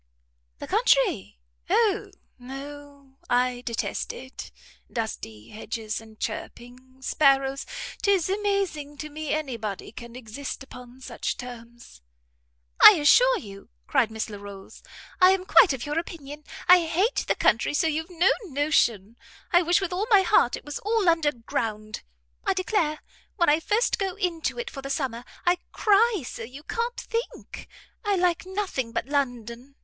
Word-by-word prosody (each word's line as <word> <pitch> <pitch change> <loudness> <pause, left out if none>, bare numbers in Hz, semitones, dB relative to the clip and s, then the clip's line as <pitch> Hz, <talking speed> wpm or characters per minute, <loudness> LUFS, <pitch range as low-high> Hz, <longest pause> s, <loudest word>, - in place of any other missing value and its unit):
"The - - -7
country? - - +2 0.3
O 435 -3 +2 0.3
no! 280 +1 -10
I 245 0 +1
detest 235 -2 -3
it! 260 +1 -10 0.4
Dusty 110 - -5
hedges, 220 0 -5
and 220 -1 -16
chirping 255 +2 -7
sparrows! 275 -1 +2 0.3
'Tis 395 -5 +2
amazing 390 -8 -1
to 305 +1 -6
me 310 +1 -6
any 295 -6 -2
body 210 -3 -5
can 235 0 -10
exist 255 +4 -7
upon 250 -1 -13
such - - -4
terms." 235 - -11 0.8
"I - - +13
assure - - +5
you," 200 - -11 0.2
cried 220 - +2
Miss 220 0 -4
Larolles, 200 -2 -10 0.4
"I'm 370 0 +5
quite 385 -1 +6
of 260 -3 -3
your 295 +2 -1
opinion. 295 -3 -8 0.2
I 360 -1 +8
hate 380 +9 +1
the - - +2
country 230 +6 +2
so 310 - +2
you've 320 +2 -1
no 355 +1 +3
notion. 245 - +1 0.3
I 350 -1 +6
wish 345 +2 +2
with 370 -2 -2
all 395 +4 -1
my 405 -4 +6
heart 250 -8 +3
it - - -11
was 295 -1 -5
all 435 -2 0
under 325 -3 +3
ground. 215 -3 -4 0.4
I - - +1
declare, 365 -5 0 0.3
when 340 -5 +3
I 300 +2 +4
first 425 +8 +1
go 385 -2 -2
into 360 -3 -2
it 485 0 -4
for 275 - -7
the 275 - -7
summer, 260 -4 -2 0.2
I 355 +1 +4
cry 425 - +3
so - - -7
you 255 +6 -9
can't 470 +7 -3
think. 460 +1 -5 0.4
I 410 -2 +1
like 355 -1 +1
nothing 375 - -3
but 230 - -1
London. 250 -2 -3
290 Hz, 150 wpm, -26 LUFS, 245-365 Hz, 0.8 s, I